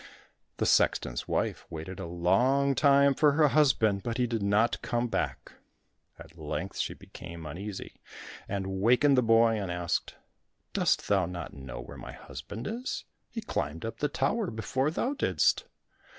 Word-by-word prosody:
The - - 0
sexton's - - +2
wife - - -1
waited 80 +4 -7
a 95 - -5
long 125 +12 +2
time 140 0 +5
for 150 +1 +4
her 150 0 +4
husband, 120 -9 +3
but 115 +1 -3
he 125 - +2
did 115 -2 -2
not 105 +4 +2
come 120 +1 -1
back. - - -3 0.7
At - - -14
length - - -4
she - - -2
became 85 -2 -10
uneasy, 95 +6 -7 0.5
and 95 -1 -3
wakened 125 +6 +5
the 125 - +5
boy, 115 -1 +4
and 95 - -4
asked, 85 -1 -2 0.6
"Dost - - +1
thou 95 -4 +2
not 90 -1 -6
know 65 -4 -8
where - - -10
my - - -8
husband 70 - -8
is? 240 +4 -3 0.3
He 230 - -5
climbed 80 - -3
up 115 - -5
the 150 - +1
tower 220 -3 0
before 130 +5 -1
thou 245 - -1
didst." 290 - +2
115 Hz, 160 wpm, -29 LUFS, 90-140 Hz, 0.7 s, time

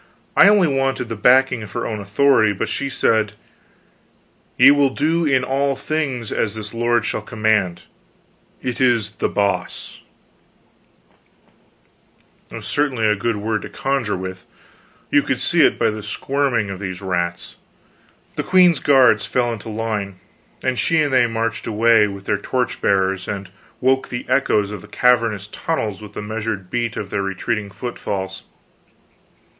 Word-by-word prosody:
I - - +7
only 205 -4 +4
wanted 135 -3 -1
the 115 - -3
backing 125 +2 +4
of 105 -1 -9
her 120 - -3
own 110 -2 -3
authority; 110 +1 +3
but 105 +3 -3
she 140 +5 -2
said: 110 -5 +1 1.2
"Ye - - +8
will 145 -1 +4
do 160 +4 0
in 130 -3 +2
all 135 +1 0
things 135 -7 -3
as 110 -1 -1
this 105 0 -6
lord 120 -1 +1
shall - - -2
command. 110 -5 0 0.8
It 125 0 -3
is 115 -5 +2
The - - -2
Boss." 100 -1 -2 2.5
It - - -10
was - - -8
certainly 135 -6 0
a 105 0 +3
good 115 +2 -1
word 105 +1 -2
to - - -8
conjure 135 -8 -1
with: 95 0 -7 0.6
you - - +5
could - - -2
see - - +2
it - - +3
by - - +2
the 105 0 -6
squirming 115 0 -1
of 95 - -6
these 95 -2 -5
rats. 85 -2 -3 0.8
The - - +1
queen's 180 -4 +4
guards 125 -7 +4
fell 120 -2 0
into 110 0 -8
line, 105 -4 -3 0.4
and 130 -1 0
she 165 - +2
and 145 -2 -1
they 125 -2 +4
marched 115 0 -3
away, 115 -1 +4
with 100 -1 -8
their - - 0
torch 125 +3 -2
bearers, 95 -1 +1
and 100 -2 -5 0.3
woke 130 +1 +1
the 120 - -5
echoes 105 -6 +1
of 105 -3 -7
the 105 - -13
cavernous 115 -3 +2
tunnels 105 -3 -3
with 105 -1 -11
the 105 - -6
measured 105 -3 -4
beat 120 -2 -2
of 100 -2 -5
their 100 - -1
retreating 100 +2 -3
footfalls. 100 -3 -5
110 Hz, 160 wpm, -20 LUFS, 100-130 Hz, 2.5 s, Ye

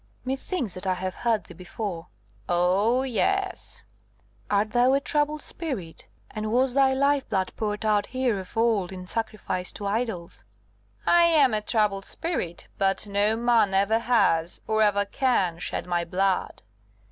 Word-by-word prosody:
"Methinks 265 - -3
that 185 +2 -6
I 185 - +2
have 185 0 -4
heard 230 -1 0
thee - - -13
before." 180 0 -6 0.4
"Oh, 195 +8 +2
yes." 390 - -1 0.7
"Art 205 +1 +1
thou 245 +3 +4
a 275 - +4
troubled 295 +1 0
spirit? 240 - -6 0.2
and 215 0 -4
was 255 +2 +2
thy 270 0 +4
life 280 +1 +1
blood 190 -2 -1
poured 210 0 -3
out 210 -1 +2
here 255 -5 0
of 190 +4 -10
old 225 -6 +2
in 185 -1 -8
sacrifice 200 -3 -3
to 205 - -7
idols?" 200 - -3 0.6
"I 345 0 +5
am 300 -7 +4
a 215 - +1
troubled 210 -3 0
spirit; 320 - -4
but 195 +2 +1
no 205 +2 +1
man 230 -4 +2
ever 200 +3 +3
has, 200 -9 +1
or 220 0 +1
ever 205 -1 +3
can, 200 -7 0
shed - - -3
my 175 -1 0
blood. 185 +2 -1
215 Hz, 155 wpm, -26 LUFS, 190-250 Hz, 0.7 s, I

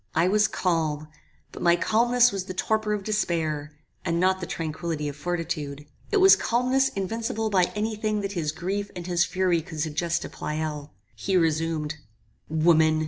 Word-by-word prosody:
I 165 +3 +4
was 210 +1 +4
calm; 155 -4 -1 0.4
but - - -9
my 170 0 +5
calmness 240 +6 +3
was 195 -2 -3
the 185 - -6
torpor 215 +2 0
of 205 -2 -2
despair, 160 -8 -1 0.3
and 170 -1 0
not 185 +1 +3
the 180 - -5
tranquillity 160 -1 -3
of 145 - -5
fortitude. 150 -3 -3 0.3
It 420 - +3
was 385 0 +8
calmness 255 +3 +2
invincible 225 +3 -2
by 185 -3 +4
any 215 +1 -1
thing 215 0 -1
that 195 0 -3
his 165 -6 -1
grief 195 +5 -3
and 175 -1 -6
his 175 -1 +2
fury 185 -3 +1
could 160 -1 -9
suggest 165 +2 -1
to - - -6
Pleyel. 150 -1 -4 0.2
He 185 - 0
resumed 160 -2 0 0.5
"Woman! 160 0 +4
175 Hz, 170 wpm, -26 LUFS, 155-210 Hz, 0.5 s, was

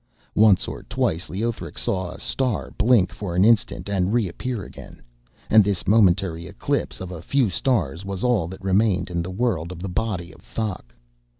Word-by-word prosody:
Once 105 -3 +5
or - - -6
twice 85 +4 -1
Leothric 100 -5 -3
saw 95 -2 -1
a - - -9
star 130 -4 -1
blink 110 -5 +3
for 90 -5 -5
an 90 +3 +4
instant 115 -3 +2
and 95 0 0
reappear 115 +1 -2
again, - - -12 0.5
and 110 -1 +6
this 100 -2 -1
momentary 95 -5 +3
eclipse - - -2
of 95 -1 -6
a 85 -3 -7
few 125 +2 +1
stars 90 - 0
was 100 -1 -5
all 120 -9 +2
that 95 +2 -10
remained 95 -1 +2
in 85 -1 -1
the 85 - -5
world 95 -5 -1
of 90 - -7
the 95 - -4
body 90 -2 -2
of - - -17
Thok. 95 - -5
95 Hz, 180 wpm, -23 LUFS, 90-110 Hz, 0.5 s, and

